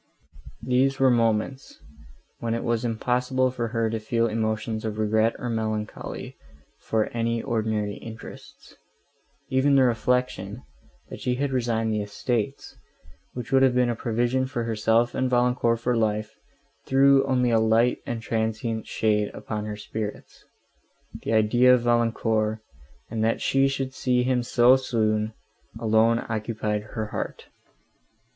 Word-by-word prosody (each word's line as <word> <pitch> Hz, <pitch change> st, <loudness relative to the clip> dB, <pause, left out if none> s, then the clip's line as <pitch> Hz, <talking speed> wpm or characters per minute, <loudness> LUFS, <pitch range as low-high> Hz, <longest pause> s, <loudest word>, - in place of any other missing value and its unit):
These 135 Hz, +2 st, +2 dB
were 135 Hz, -1 st, +5 dB
moments, 115 Hz, +3 st, 0 dB, 0.6 s
when 115 Hz, -1 st, -1 dB
it 115 Hz, -, -3 dB
was 120 Hz, -1 st, 0 dB
impossible 125 Hz, +2 st, 0 dB
for 120 Hz, -2 st, -3 dB
her 115 Hz, 0 st, 0 dB
to 115 Hz, -, -2 dB
feel 115 Hz, +2 st, 0 dB
emotions 110 Hz, 0 st, -2 dB
of 110 Hz, -1 st, -3 dB
regret, 110 Hz, +1 st, +2 dB
or 125 Hz, -, -5 dB
melancholy, 110 Hz, -2 st, -4 dB, 0.4 s
for 110 Hz, +1 st, -1 dB
any 115 Hz, 0 st, 0 dB
ordinary 110 Hz, -4 st, -1 dB
interests;—even 130 Hz, +4 st, -5 dB
the 135 Hz, -, +6 dB
reflection, 120 Hz, -3 st, 0 dB, 0.5 s
that -, -, -7 dB
she 125 Hz, -, -1 dB
had 140 Hz, +2 st, -1 dB
resigned 115 Hz, -3 st, 0 dB
the 105 Hz, -, 0 dB
estates, 110 Hz, +5 st, -3 dB, 0.6 s
which 125 Hz, +2 st, -7 dB
would 135 Hz, 0 st, +5 dB
have 130 Hz, -2 st, +4 dB
been 125 Hz, -1 st, +3 dB
a -, -, -2 dB
provision 120 Hz, +3 st, 0 dB
for 120 Hz, -3 st, -3 dB
herself 115 Hz, +1 st, +1 dB
and 130 Hz, 0 st, 0 dB
Valancourt 120 Hz, -1 st, +2 dB
for 120 Hz, +1 st, 0 dB
life, 110 Hz, -1 st, -1 dB, 0.5 s
threw 135 Hz, 0 st, +5 dB
only 125 Hz, -2 st, +1 dB
a 115 Hz, -, +4 dB
light 110 Hz, +2 st, +3 dB
and 115 Hz, -1 st, -5 dB
transient 110 Hz, 0 st, -2 dB
shade 105 Hz, -1 st, +1 dB
upon 105 Hz, -1 st, -5 dB
her 105 Hz, -1 st, -5 dB
spirits. 105 Hz, 0 st, -6 dB, 0.8 s
The -, -, -2 dB
idea 120 Hz, +4 st, +5 dB
of 125 Hz, -, -1 dB
Valancourt, 115 Hz, -2 st, +1 dB, 0.5 s
and 110 Hz, -1 st, -1 dB
that 115 Hz, +1 st, +1 dB
she 135 Hz, 0 st, +2 dB
should 135 Hz, -1 st, -3 dB
see 125 Hz, -1 st, +1 dB
him 125 Hz, -1 st, +1 dB
so 120 Hz, +2 st, +5 dB
soon, 110 Hz, -4 st, 0 dB, 0.5 s
alone 115 Hz, +1 st, +2 dB
occupied 110 Hz, -1 st, -2 dB
her 110 Hz, -, -1 dB
heart. -, -, -5 dB
115 Hz, 140 wpm, -25 LUFS, 110-125 Hz, 0.8 s, the